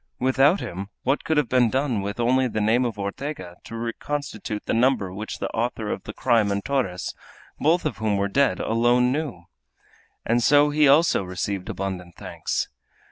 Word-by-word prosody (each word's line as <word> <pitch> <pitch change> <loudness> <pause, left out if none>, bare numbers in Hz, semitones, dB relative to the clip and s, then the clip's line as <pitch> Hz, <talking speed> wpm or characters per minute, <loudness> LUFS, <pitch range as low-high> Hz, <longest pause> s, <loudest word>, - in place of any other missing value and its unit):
Without 135 +7 +3
him 95 +3 -5 0.2
what 135 +3 +1
could 160 - 0
have 150 - +2
been 125 -1 +3
done 130 -4 0
with 100 +3 -5
only 130 +2 +3
the 110 - -3
name 115 +4 +2
of 115 -3 -3
Ortega 100 -3 -5
to 115 - -8
reconstitute 115 -2 -4
the - - -1
number 115 -6 +2
which 105 +3 -5
the - - -3
author 115 -2 -2
of - - -5
the - - -5
crime 115 -5 +2
and 100 0 -2
Torres, 125 -11 -1 0.5
both 165 +3 +2
of 145 -7 -2
whom 105 -1 0
were 100 0 +1
dead, 115 -3 +2
alone 120 +2 +2
knew? 135 - -3 0.8
And 120 +1 +2
so 145 +3 +5
he 150 0 +4
also 150 0 +5
received 95 +1 -4
abundant 90 -3 -5
thanks. - - -3
115 Hz, 180 wpm, -24 LUFS, 100-135 Hz, 0.8 s, so